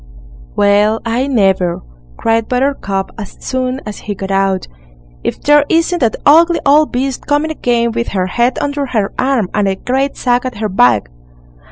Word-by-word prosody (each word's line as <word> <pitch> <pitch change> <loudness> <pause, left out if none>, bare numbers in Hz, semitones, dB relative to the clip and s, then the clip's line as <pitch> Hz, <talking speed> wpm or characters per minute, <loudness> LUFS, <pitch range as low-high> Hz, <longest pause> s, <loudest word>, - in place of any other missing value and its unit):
"Well, 205 +2 +3
I 240 +4 0
never!" 190 -8 +1 0.3
cried 225 0 0
Buttercup, 250 -7 -1
as 205 - -8
soon 260 0 -3
as 210 -1 -7
he 205 - -5
got 195 0 -5
out; 195 -1 0 0.6
"if - - -3
there 295 0 +4
isn't 335 +1 +1
that 230 -4 +1
ugly 330 +3 +5
old 300 +2 +4
beast 260 +1 -3
coming 295 +2 +1
again 235 -5 0
with 235 +1 -2
her 185 -2 -1
head 240 +7 0
under 285 -1 -2
her 215 -5 -1
arm, 255 -7 +1
and 205 -1 +1
a 190 - 0
great 265 +7 -2
sack 245 -1 +1
at 255 -4 -5
her 215 0 -2
back." 120 - +2
235 Hz, 170 wpm, -15 LUFS, 200-275 Hz, 0.6 s, ugly